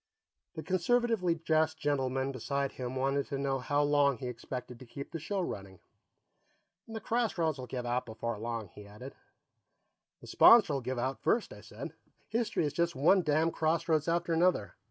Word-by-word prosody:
The 155 Hz, -, -5 dB
conservatively 190 Hz, -1 st, +1 dB
dressed 160 Hz, -1 st, +1 dB
gentleman 135 Hz, -2 st, -1 dB
beside 135 Hz, +2 st, -2 dB
him 125 Hz, 0 st, -5 dB
wanted 135 Hz, +1 st, 0 dB
to 140 Hz, -, -3 dB
know 135 Hz, -1 st, -1 dB
how 145 Hz, +3 st, +1 dB
long 145 Hz, -2 st, +3 dB
he 125 Hz, -, -7 dB
expected 125 Hz, 0 st, -6 dB
to 130 Hz, -, -11 dB
keep 140 Hz, +4 st, -8 dB
the 165 Hz, -, -4 dB
show 190 Hz, +6 st, -2 dB
running. 95 Hz, -, -6 dB, 1.1 s
"The 225 Hz, -1 st, -6 dB
crossroads 185 Hz, -, 0 dB
will 125 Hz, -, -6 dB
give 125 Hz, +1 st, -5 dB
out 120 Hz, +1 st, -1 dB
before 115 Hz, 0 st, -4 dB
long," 115 Hz, -3 st, -4 dB
he 105 Hz, +2 st, -13 dB
added. 105 Hz, +7 st, -10 dB, 1.1 s
"The -, -, -14 dB
sponsor'll 195 Hz, -, +6 dB
give 130 Hz, +1 st, -3 dB
out 130 Hz, +3 st, -2 dB
first," 230 Hz, -, +1 dB
I -, -, -12 dB
said. -, -, -8 dB, 0.4 s
"History 230 Hz, -7 st, 0 dB
is 145 Hz, -, -2 dB
just 170 Hz, +1 st, 0 dB
one 170 Hz, +8 st, +4 dB
damn 160 Hz, +1 st, +2 dB
crossroads 160 Hz, -1 st, +1 dB
after 170 Hz, 0 st, 0 dB
another." 170 Hz, -, +2 dB
145 Hz, 170 wpm, -31 LUFS, 125-170 Hz, 1.1 s, sponsor'll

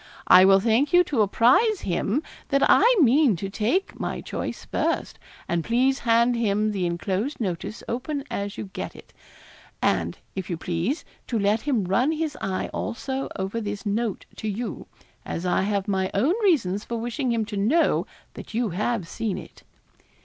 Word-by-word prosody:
I 185 Hz, +1 st, +8 dB
will 195 Hz, 0 st, +6 dB
thank 235 Hz, -, +2 dB
you 355 Hz, 0 st, +7 dB
to 275 Hz, -10 st, 0 dB
apprise 255 Hz, -, +4 dB
him 205 Hz, -, -1 dB, 0.3 s
that 275 Hz, 0 st, +2 dB
I -, -, +6 dB, 0.2 s
mean 270 Hz, -3 st, +5 dB
to 195 Hz, +3 st, -5 dB
take 230 Hz, -, -1 dB
my -, -, -3 dB
choice -, -, -5 dB
first; -, -, -2 dB, 0.3 s
and 170 Hz, -1 st, 0 dB
please 260 Hz, -, +2 dB
hand 235 Hz, +1 st, +3 dB
him 215 Hz, -2 st, +1 dB
the 190 Hz, -4 st, -1 dB
enclosed 185 Hz, -, -2 dB
notice 195 Hz, +1 st, -4 dB
open 265 Hz, +4 st, -3 dB
as 200 Hz, 0 st, -3 dB
you 195 Hz, -, -6 dB
get -, -, -5 dB
it; -, -, -15 dB, 0.7 s
and, -, -, 0 dB, 0.2 s
if 190 Hz, -2 st, -5 dB
you 170 Hz, -, -2 dB
please, 175 Hz, -, -2 dB, 0.2 s
to 235 Hz, -, -1 dB
let 210 Hz, +2 st, +2 dB
him 260 Hz, -8 st, 0 dB
run 235 Hz, -, +2 dB
his 315 Hz, -2 st, -2 dB
eye 190 Hz, -1 st, -2 dB
also 265 Hz, +3 st, -3 dB
over 195 Hz, +4 st, -3 dB
this 205 Hz, -1 st, -5 dB
note 210 Hz, 0 st, -1 dB
to 220 Hz, -, -4 dB
you, 220 Hz, +3 st, -4 dB, 0.4 s
as 170 Hz, -, -4 dB
I 180 Hz, -, +2 dB
have 200 Hz, 0 st, -1 dB
my 190 Hz, -2 st, 0 dB
own 265 Hz, -, +3 dB
reasons 215 Hz, -, +2 dB
for 235 Hz, -, -4 dB
wishing 240 Hz, +3 st, -2 dB
him 225 Hz, -2 st, 0 dB
to 210 Hz, -, -6 dB
know 250 Hz, +13 st, +2 dB, 0.3 s
that -, -, -9 dB
you 235 Hz, -1 st, +1 dB
have 200 Hz, +1 st, -1 dB
seen 215 Hz, +2 st, -3 dB
it. -, -, -11 dB
220 Hz, 175 wpm, -25 LUFS, 195-260 Hz, 0.7 s, I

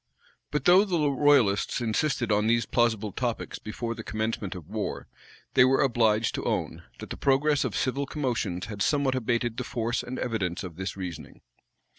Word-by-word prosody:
But 150 Hz, -2 st, -2 dB
though 185 Hz, +3 st, +7 dB
the 165 Hz, -8 st, +1 dB
royalists 130 Hz, -9 st, +3 dB
insisted 120 Hz, +1 st, 0 dB
on 105 Hz, +1 st, +2 dB
these 115 Hz, +1 st, +2 dB
plausible 110 Hz, -3 st, +1 dB
topics 120 Hz, +2 st, -3 dB
before 115 Hz, +2 st, -4 dB
the -, -, -8 dB
commencement 110 Hz, -4 st, -3 dB
of 85 Hz, -4 st, -9 dB
war, 105 Hz, +1 st, -4 dB, 0.5 s
they -, -, +7 dB
were 130 Hz, +1 st, +4 dB
obliged 115 Hz, -4 st, +2 dB
to -, -, -3 dB
own, -, -, -2 dB, 0.2 s
that -, -, -9 dB
the -, -, -4 dB
progress 140 Hz, +1 st, +2 dB
of -, -, -3 dB
civil 135 Hz, +2 st, -1 dB
commotions 120 Hz, -, -2 dB
had 105 Hz, -2 st, -7 dB
somewhat 140 Hz, +2 st, +2 dB
abated 120 Hz, -1 st, -1 dB
the 125 Hz, -, -2 dB
force 120 Hz, -1 st, -2 dB
and 130 Hz, +1 st, -6 dB
evidence 100 Hz, -7 st, -2 dB
of 90 Hz, -4 st, -7 dB
this 95 Hz, +2 st, -5 dB
reasoning. 90 Hz, -4 st, -7 dB
115 Hz, 175 wpm, -27 LUFS, 105-135 Hz, 0.5 s, though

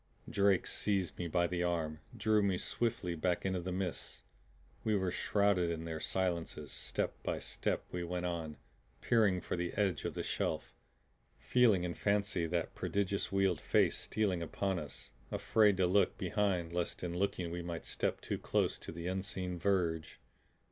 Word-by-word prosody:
Drake 100 Hz, -2 st, +3 dB
seized 95 Hz, -5 st, 0 dB
me 90 Hz, -, -1 dB
by 85 Hz, +1 st, +2 dB
the 85 Hz, 0 st, -1 dB
arm, 80 Hz, -3 st, 0 dB, 0.2 s
drew 110 Hz, -1 st, +3 dB
me 100 Hz, -2 st, +2 dB
swiftly 100 Hz, -4 st, -1 dB
back 85 Hz, +3 st, 0 dB
into 95 Hz, -1 st, +1 dB
the 90 Hz, +1 st, -4 dB
mists. 90 Hz, -1 st, -3 dB, 0.6 s
We 110 Hz, -1 st, +2 dB
were 95 Hz, -2 st, +1 dB
shrouded 100 Hz, -4 st, +2 dB
in 80 Hz, -1 st, -3 dB
their 80 Hz, -1 st, -3 dB
silences. 85 Hz, -5 st, -1 dB
Step -, -, -1 dB
by -, -, -1 dB
step -, -, -2 dB
we 90 Hz, -1 st, -2 dB
went 90 Hz, +1 st, -2 dB
on, 80 Hz, -3 st, -3 dB, 0.4 s
peering 105 Hz, -6 st, +3 dB
for -, -, -2 dB
the 85 Hz, 0 st, -2 dB
edge 95 Hz, -6 st, +1 dB
of -, -, -2 dB
the -, -, -2 dB
shelf, -, -, -2 dB, 0.6 s
feeling 115 Hz, -8 st, +4 dB
in 90 Hz, -1 st, -1 dB
fancy 100 Hz, -4 st, +1 dB
that 85 Hz, 0 st, -1 dB
prodigious 100 Hz, 0 st, -1 dB
wheeled 95 Hz, -4 st, +2 dB
face -, -, +3 dB
stealing 100 Hz, -5 st, 0 dB
upon 95 Hz, +3 st, -1 dB
us; 75 Hz, -3 st, -8 dB, 0.2 s
afraid 105 Hz, -3 st, +4 dB
to 95 Hz, -, +4 dB
look 95 Hz, +3 st, +3 dB
behind 90 Hz, -3 st, 0 dB
lest 90 Hz, 0 st, -2 dB
in 85 Hz, -1 st, -2 dB
looking 90 Hz, -2 st, -1 dB
we 85 Hz, +1 st, -3 dB
might 85 Hz, -1 st, -5 dB
step -, -, -1 dB
too -, -, -3 dB
close -, -, +1 dB
to -, -, -7 dB
the 85 Hz, +1 st, -6 dB
unseen 95 Hz, -1 st, -3 dB
verge. 85 Hz, -4 st, 0 dB
90 Hz, 170 wpm, -34 LUFS, 85-100 Hz, 0.6 s, feeling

